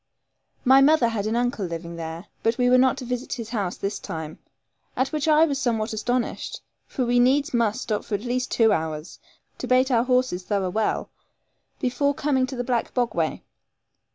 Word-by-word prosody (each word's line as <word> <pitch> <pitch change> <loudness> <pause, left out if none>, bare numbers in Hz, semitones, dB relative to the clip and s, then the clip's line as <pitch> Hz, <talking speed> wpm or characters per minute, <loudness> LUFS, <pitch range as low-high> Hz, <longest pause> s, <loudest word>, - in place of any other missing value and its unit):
My 265 +2 +7
mother 275 -4 +5
had 215 -2 -2
an 220 - -1
uncle 245 -3 0
living 170 -1 -5
there, 165 +2 -6 0.2
but 225 +1 +1
we 245 0 +3
were 255 - +6
not 260 0 +3
to 260 - -6
visit 250 +1 -3
his 230 -3 -6
house 205 -7 -2
this 200 +1 -3
time, 160 -1 -6 0.6
at 260 - 0
which 305 0 -2
I 310 +1 +6
was 280 -4 -2
somewhat 225 -3 -1
astonished, 245 +3 -2 0.3
since 255 -3 -2
we 245 0 +3
needs 265 +3 +3
must 235 0 +1
stop 215 -2 -2
for 210 - -3
at 200 - -4
least 250 +2 -2
two 225 -2 +3
hours, 160 -1 -4 0.4
to - - -4
bait 255 +1 +3
our 235 -1 +3
horses 250 -7 +1
thorough 190 -1 -1
well, 215 +2 -1 0.7
before 280 +3 0
coming 265 -2 +1
to 265 - -6
the 245 - -2
black 240 -2 -2
bogway. 220 -10 -1
240 Hz, 190 wpm, -24 LUFS, 205-255 Hz, 0.7 s, My